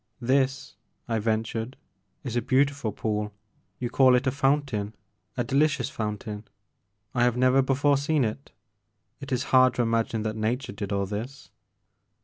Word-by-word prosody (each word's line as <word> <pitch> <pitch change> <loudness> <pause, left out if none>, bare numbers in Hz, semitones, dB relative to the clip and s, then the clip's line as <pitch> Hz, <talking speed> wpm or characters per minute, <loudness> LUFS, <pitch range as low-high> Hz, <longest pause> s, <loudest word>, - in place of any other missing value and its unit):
This,*' 135 0 0 0.3
I 115 -2 0
ventured, 110 +3 -2 0.5
*'is 125 -3 -4
a 120 - +2
beautiftd 135 -3 +1
pool, 105 -1 -2 0.2
— - - -42
you 120 -1 -3
call 130 -1 +5
it 125 - +1
a 130 - +2
fountain, 135 -7 0 0.2
— 105 - -42
a 120 - +1
delicious 140 +1 +1
fountain: 105 0 -5 0.7
I 120 -2 +2
have 125 -1 +2
never 130 +1 +4
before 140 +2 +2
seen 145 0 +1
it. 110 +6 -5 0.7
It 140 -1 -9
is 130 0 0
hard 130 -1 +6
to 120 - +1
imagine 115 -1 0
that 110 0 -2
nature 115 +4 -2
did 100 0 -6
all 100 -1 0
this.' 115 +8 -6
125 Hz, 160 wpm, -26 LUFS, 110-135 Hz, 0.7 s, hard